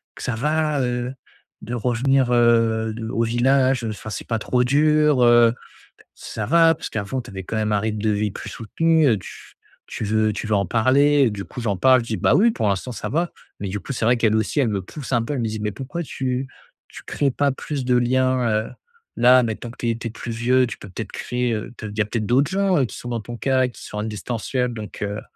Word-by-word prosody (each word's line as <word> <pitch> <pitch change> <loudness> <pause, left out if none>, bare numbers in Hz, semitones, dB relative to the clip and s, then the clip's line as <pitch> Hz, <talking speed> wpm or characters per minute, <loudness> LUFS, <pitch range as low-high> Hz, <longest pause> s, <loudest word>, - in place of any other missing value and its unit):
que - - -9
ça 120 - -2
va, 150 +3 0
heu, 125 0 -2 0.5
de 120 - -6
revenir, 125 +2 +1
heu, 115 -2 +3
de 115 -1 -5
au 115 -2 0
village, 130 +2 +2
heu, 115 - -2
enfin, 110 +1 -7
c'est - - -6
pas 115 -2 -1
trop 125 +3 +1
dur, 150 0 +3
heu? 120 -1 +6 0.6
Ça 110 - -6
va 165 +3 +5
parce - - -7
qu'avant 110 +5 -3
tu - - -12
avais 95 -1 -7
quand - - -6
même 110 0 0
un 105 - +3
rythme 110 0 -2
de 110 - +2
vie 105 0 0
plus - - -8
soutenu, 160 +7 +1
heu, 110 - +3
tu 90 - -12 0.3
tu - - -5
veux 110 +1 +1
tu - - -5
veux 110 - +1
en 100 -1 +1
parler?» 135 - +3
Du 100 -2 -5
coup, 125 - -8
j'en 105 -4 -1
parle, 130 +6 +5
je 115 - -10
dis: 110 - -2
«Bah, 90 - +2
oui, 230 +4 +5
pour 110 - -1
l'instant 100 +6 -2
ça - - -5
va», 170 +3 -1 0.3
mais 100 - -3
du 100 +1 -4
coup, 140 - -6
c'est 115 - -2
vrai 120 +2 +4
qu'elles 110 -2 +2
aussi 110 +7 0
elles 125 - +2
me 100 -3 -2
poussent 135 +6 -9
un 120 -2 +3
peu, 145 +5 -3
elles 130 - -2
me 115 - -1
disent: 110 0 -4
«Mais 105 -1 -2
pourquoi 135 - -5
tu 130 -2 -3 0.4
tu - - -11
crées 140 -2 0
pas 145 +1 +1
plus 135 0 -5
de 125 0 +2
liens, 130 0 +2 0.2
heu, - - -11 0.5
là, 125 +1 +6
maintenant 115 +1 -4
que - - -17
tu 120 - -1
es 115 - -1
tu 115 - -4
es - - -7
plus 115 +1 -6
vieux, 125 +3 +2
tu 105 - -7
peux - - -11
peut-être - - -7
créer, 125 -1 -2
heu, 110 +2 -5
te 110 - -7
il 105 +1 -8
y - - +4
a - - -2
peut-être 110 -1 -3
d'autres 135 - +2
gens, 195 -1 +2
heu, 135 - +3
qui - - -10
sont 125 - -8
dans 115 -1 -2
ton 120 +2 -8
cas 130 +1 +1
et 125 - -6
qui - - -13
sont 105 - -7
en 105 - -2
distanciel», 120 +3 -3
donc 110 -2 -8
heu, 100 +1 -3
120 Hz, 260 wpm, -22 LUFS, 110-130 Hz, 0.6 s, heu